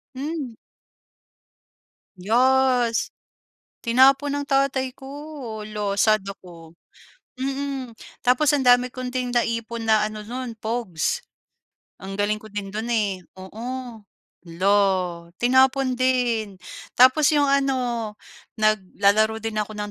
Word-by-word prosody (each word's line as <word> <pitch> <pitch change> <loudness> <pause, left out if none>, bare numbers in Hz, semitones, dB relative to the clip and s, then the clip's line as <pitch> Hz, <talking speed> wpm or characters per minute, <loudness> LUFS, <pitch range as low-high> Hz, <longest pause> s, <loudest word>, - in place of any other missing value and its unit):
Hmm. 280 -2 -4 1.7
Yes. 245 +2 +2 0.7
Tinapon 270 +4 +4
ng - - -9
tatay 270 -2 +1
ko. 275 -5 -8
Hala, 210 -1 -3
sad 215 -1 +4
ako. 170 -4 -11 0.7
Mm. 270 -1 -3 0.3
Tapos 255 +4 +3
ang 275 - 0
dami 245 0 +5
kong 255 0 -5
din 255 -1 -2
naipon 230 -1 -1
na 215 -1 +4
ano 215 0 -8
no'n, 245 +1 -6
pogs. 220 - -2 0.8
Ang 195 0 -6
galing 210 +1 +1
ko - - -11
din 205 -1 -5
dun, 220 +4 -4
eh, 205 -5 0 0.2
oo. 190 +4 -10 0.8
Hala, 185 +4 +1 0.6
tinapon 260 +1 +3
din. 240 -6 0 0.4
Tapos 260 +4 +6
yung 295 -2 +3
ano, 255 -5 0 0.5
naglalaro 215 +1 +2
din 225 0 -5
ako 210 0 -2
ng 205 0 -4
240 Hz, 110 wpm, -23 LUFS, 215-265 Hz, 1.7 s, Tapos